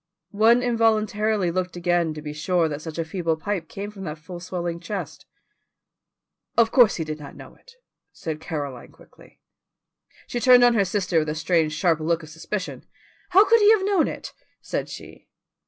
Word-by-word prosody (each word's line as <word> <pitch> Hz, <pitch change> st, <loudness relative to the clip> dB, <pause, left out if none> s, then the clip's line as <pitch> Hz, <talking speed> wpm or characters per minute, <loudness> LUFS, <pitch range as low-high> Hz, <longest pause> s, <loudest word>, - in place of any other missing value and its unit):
One 230 Hz, +4 st, +4 dB
involuntarily 215 Hz, -4 st, +1 dB
looked 185 Hz, +1 st, -3 dB
again 175 Hz, -2 st, 0 dB
to 150 Hz, -, -8 dB
be 150 Hz, -1 st, -5 dB
sure 165 Hz, +2 st, +1 dB
that 150 Hz, -1 st, -5 dB
such 160 Hz, 0 st, -7 dB
a 165 Hz, -, -1 dB
feeble 165 Hz, -1 st, -2 dB
pipe 175 Hz, 0 st, -3 dB
came 205 Hz, +1 st, -6 dB
from 200 Hz, -2 st, -10 dB
that 155 Hz, -1 st, -5 dB
full 175 Hz, +3 st, -9 dB
swelling 175 Hz, -1 st, -4 dB
chest. 195 Hz, +4 st, -6 dB, 1.3 s
"Of 230 Hz, -1 st, +4 dB
course 240 Hz, -5 st, +5 dB
he 165 Hz, -, -2 dB
did 155 Hz, 0 st, -6 dB
not 145 Hz, -2 st, -10 dB
know -, -, -12 dB
it," -, -, -20 dB, 0.4 s
said 155 Hz, -2 st, -6 dB
Caroline 145 Hz, -6 st, -6 dB
quickly. -, -, -20 dB, 0.8 s
She 240 Hz, -, -4 dB
turned 245 Hz, +1 st, +6 dB
on 245 Hz, 0 st, +6 dB
her 205 Hz, -4 st, +2 dB
sister 185 Hz, -3 st, 0 dB
with 155 Hz, -1 st, -2 dB
a 150 Hz, -, -2 dB
strange 160 Hz, -1 st, +1 dB
sharp 165 Hz, 0 st, +1 dB
look 165 Hz, +1 st, -1 dB
of 155 Hz, -, -11 dB
suspicion. 180 Hz, +5 st, -5 dB, 0.5 s
"How 380 Hz, +3 st, +6 dB
could 460 Hz, +3 st, +5 dB
he 415 Hz, -1 st, +6 dB
have 395 Hz, -3 st, +1 dB
known 395 Hz, -5 st, +2 dB
it?" -, -, -7 dB, 0.3 s
said -, -, -4 dB
she. -, -, -11 dB
180 Hz, 185 wpm, -24 LUFS, 160-215 Hz, 1.3 s, turned